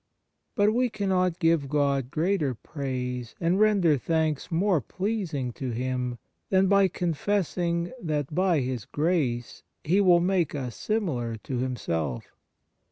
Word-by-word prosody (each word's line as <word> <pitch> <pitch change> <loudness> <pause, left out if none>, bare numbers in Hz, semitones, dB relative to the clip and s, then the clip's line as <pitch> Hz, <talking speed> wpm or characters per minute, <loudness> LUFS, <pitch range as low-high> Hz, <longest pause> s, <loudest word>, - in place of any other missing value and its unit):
But 210 0 +3
we 250 +1 +2
cannot 185 -5 0
give 165 -5 +2
God 140 -3 +1
greater 155 -3 0
praise 125 -3 -4
and 175 +3 +1
render 195 -9 +4
thanks 160 +2 -1
more 175 -1 +2
pleasing 180 - -2
to 130 +1 -4
Him 125 +1 -2 0.3
than 190 0 +4
by 200 0 +5
confessing 175 0 -1
that 150 -3 -2
by 180 -3 +2
His 125 -4 -3
grace 145 -7 -1 0.2
He 185 +6 +3
will 180 -3 +6
make 175 -3 +1
us 125 -5 -4
similar 150 - -1
to 130 - -3
Himself. 85 - -2
160 Hz, 130 wpm, -27 LUFS, 130-185 Hz, 0.3 s, will